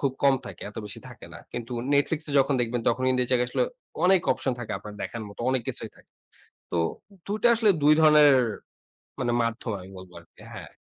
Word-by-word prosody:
খুব 140 Hz, -2 st, 0 dB
কম 140 Hz, -1 st, +6 dB
থাকে, 100 Hz, -4 st, -9 dB
এত -, -, -21 dB
বেশি 105 Hz, -, -8 dB
থাকে -, -, -12 dB
না। -, -, -9 dB
কিন্তু 120 Hz, +1 st, -6 dB, 0.2 s
Netflix 145 Hz, +2 st, +1 dB
এ -, -, -4 dB
যখন 135 Hz, +1 st, +3 dB
দেখবেন, 120 Hz, 0 st, -1 dB
তখন 120 Hz, +2 st, 0 dB
কিন্তু 130 Hz, -1 st, +2 dB
এই -, -, -12 dB
জায়গায় 125 Hz, -1 st, +2 dB
আসলে -, -, +1 dB, 0.4 s
অনেক 185 Hz, 0 st, +5 dB
অপশন 130 Hz, -, -2 dB
থাকে 120 Hz, -, -5 dB
আপনার 105 Hz, +1 st, -10 dB
দেখার 115 Hz, -, -5 dB
মতো 100 Hz, -, -12 dB
অনেক 130 Hz, -2 st, 0 dB
কিছুই -, -, -4 dB
থাকে। -, -, -22 dB, 0.6 s
তো 85 Hz, -, 0 dB, 0.5 s
২ 205 Hz, +2 st, -2 dB
টা 240 Hz, -, +6 dB
আসলে 220 Hz, -2 st, +4 dB
২ 150 Hz, +1 st, +6 dB
ধরনের 150 Hz, -2 st, +7 dB, 0.9 s
মানে 120 Hz, -2 st, 0 dB
মাধ্যম 115 Hz, 0 st, -3 dB
আমি 95 Hz, -, -12 dB
বলবো 95 Hz, -1 st, -12 dB
আরকি। 85 Hz, -, -21 dB
হ্যাঁ। -, -, -9 dB
125 Hz, 210 wpm, -26 LUFS, 115-145 Hz, 0.9 s, ধরনের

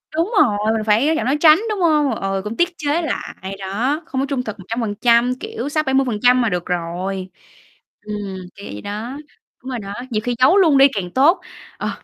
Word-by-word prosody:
đúng 340 Hz, +8 st, 0 dB
rồi, 210 Hz, -7 st, +3 dB, 0.2 s
mình 220 Hz, -, -1 dB
phải 220 Hz, +5 st, +3 dB
nói 320 Hz, -, +2 dB
giảm -, -, -1 dB
nói 275 Hz, +4 st, +1 dB
tránh, 315 Hz, +2 st, +7 dB
đúng 420 Hz, -2 st, -2 dB
hông? 300 Hz, -4 st, +3 dB
Ừ, 195 Hz, 0 st, -2 dB
cũng 215 Hz, +2 st, -5 dB
tiết 345 Hz, +1 st, +3 dB
chế 305 Hz, +3 st, 0 dB
lại. 195 Hz, -, -5 dB
Đó, 235 Hz, -, -1 dB
không 265 Hz, 0 st, -3 dB
có -, -, 0 dB
trung 260 Hz, -3 st, -1 dB
thực 215 Hz, -3 st, -7 dB
100%, 235 Hz, +4 st, +1 dB
kiểu, 250 Hz, +5 st, -5 dB
60%-70% 255 Hz, -5 st, +2 dB
là 230 Hz, -, +1 dB
được 180 Hz, -2 st, -2 dB
rồi. 180 Hz, +2 st, -3 dB, 0.7 s
Ừm, 210 Hz, 0 st, -5 dB, 0.4 s
kiểu 200 Hz, -, -11 dB
vậy 105 Hz, -, -7 dB
đó, 225 Hz, +7 st, -5 dB, 0.5 s
đúng 260 Hz, -, -7 dB
rồi 250 Hz, -3 st, -3 dB
đó, 200 Hz, 0 st, -7 dB, 0.2 s
nhiều 215 Hz, -2 st, -1 dB
khi 245 Hz, -1 st, -1 dB
giấu 335 Hz, +10 st, +5 dB
luôn 320 Hz, -8 st, +5 dB
đi 275 Hz, +1 st, +8 dB
càng 180 Hz, -3 st, -4 dB
tốt. 290 Hz, -, +3 dB, 0.4 s
Ờ, -, -, -3 dB
245 Hz, 205 wpm, -20 LUFS, 205-285 Hz, 0.7 s, đi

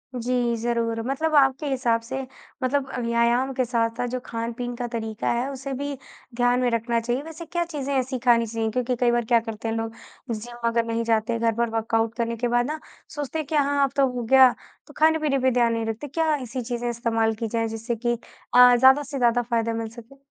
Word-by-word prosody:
जी, 245 Hz, -1 st, 0 dB
ज़रूर। 230 Hz, 0 st, -1 dB
मतलब 310 Hz, +4 st, -1 dB
आपके 270 Hz, +1 st, +4 dB
हिसाब 240 Hz, -4 st, +1 dB
से 265 Hz, +4 st, -5 dB, 0.4 s
मतलब 265 Hz, +1 st, 0 dB
अ, 250 Hz, -, -4 dB
व्यायाम 235 Hz, +3 st, +1 dB
के 255 Hz, -1 st, 0 dB
साथ-साथ 230 Hz, 0 st, -1 dB
जो 255 Hz, +1 st, -3 dB
खान-पीन 235 Hz, +1 st, -4 dB
का 240 Hz, 0 st, -3 dB
तरीका 220 Hz, -1 st, -2 dB
है, 245 Hz, +3 st, -1 dB
उसे 270 Hz, 0 st, -5 dB
भी 285 Hz, +2 st, -3 dB, 0.4 s
ध्यान 245 Hz, 0 st, +2 dB
में 250 Hz, -, +2 dB
रखना 230 Hz, 0 st, 0 dB
चाहिए। 240 Hz, +3 st, -2 dB
वैसे 325 Hz, +1 st, -9 dB
क्या 345 Hz, +2 st, -1 dB
चीज़ें 280 Hz, -4 st, -4 dB
ऐसी 260 Hz, 0 st, -1 dB
खानी 235 Hz, -2 st, +4 dB
चाहिए? 225 Hz, 0 st, -2 dB
क्योंकि 250 Hz, +2 st, -1 dB
कई 240 Hz, 0 st, +2 dB
बार 240 Hz, -1 st, +1 dB
क्या 235 Hz, +1 st, +4 dB
करते 225 Hz, 0 st, -6 dB
हैं 225 Hz, -, -1 dB
लोग, 225 Hz, 0 st, -3 dB, 0.4 s
जिम 235 Hz, +2 st, -4 dB
अगर 230 Hz, 0 st, +1 dB
नहीं 230 Hz, 0 st, -1 dB
जाते, 230 Hz, 0 st, +1 dB
घर 230 Hz, 0 st, +2 dB
पर 235 Hz, 0 st, 0 dB
वर्कआउट 225 Hz, 0 st, 0 dB
करने 235 Hz, -1 st, -1 dB
के 245 Hz, -, 0 dB
बाद 240 Hz, 0 st, +2 dB
ना, 310 Hz, +1 st, -4 dB, 0.4 s
सोचते 295 Hz, +2 st, -3 dB
हैं 310 Hz, -, -3 dB
कि, 310 Hz, -, -2 dB
"हाँ, 285 Hz, 0 st, +2 dB
अब 275 Hz, -, +1 dB
तो 275 Hz, -1 st, +5 dB
हो 245 Hz, -1 st, -3 dB
गया।" 260 Hz, +2 st, +7 dB, 0.4 s
तो 295 Hz, -, -14 dB
खाने-पीने 310 Hz, -3 st, +3 dB
पे 260 Hz, 0 st, +2 dB
ध्यान 235 Hz, -1 st, +2 dB
नहीं 230 Hz, -1 st, -2 dB
रखते। 225 Hz, +6 st, -4 dB
क्या 315 Hz, +2 st, 0 dB
ऐसी 255 Hz, -2 st, -5 dB
चीज़ें 240 Hz, 0 st, -3 dB
इस्तेमाल 225 Hz, -1 st, 0 dB
की 225 Hz, +1 st, -3 dB
जाएँ, 225 Hz, +1 st, -1 dB
जिससे 225 Hz, +2 st, -3 dB
कि 240 Hz, +1 st, -1 dB, 0.4 s
अ, 250 Hz, 0 st, +9 dB
ज़्यादा 265 Hz, +4 st, +6 dB
से 275 Hz, 0 st, -6 dB
ज़्यादा 245 Hz, -1 st, +3 dB
फ़ायदा 230 Hz, -1 st, +1 dB
मिल 225 Hz, -1 st, -3 dB
सके? 235 Hz, +4 st, -14 dB
240 Hz, 220 wpm, -24 LUFS, 230-265 Hz, 0.4 s, अ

